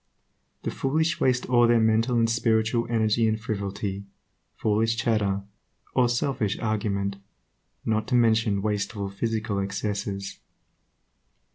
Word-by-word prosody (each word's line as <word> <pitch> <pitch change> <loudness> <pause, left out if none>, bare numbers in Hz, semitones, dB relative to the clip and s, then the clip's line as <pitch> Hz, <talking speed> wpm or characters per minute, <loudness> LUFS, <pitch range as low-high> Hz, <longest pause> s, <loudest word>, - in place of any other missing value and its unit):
The - - -2
foolish 160 +5 0
waste 125 -1 +2
all 120 -1 +5
their 120 0 +4
mental 110 +2 +2
and 115 0 +3
spiritual 115 0 +1
energy 110 0 +2
in 110 0 +1
frivolity, 100 -2 -4 0.5
foolish 110 +1 +1
chatter, 105 -4 0 0.5
or 125 -2 +3
selfish 120 -4 0
argument, 100 -3 -1 0.7
not 110 -1 0
to 125 - +1
mention 110 -4 +3
wasteful 105 -1 -2
physical 110 0 -2
excesses. 100 0 -3
110 Hz, 115 wpm, -26 LUFS, 100-115 Hz, 0.7 s, all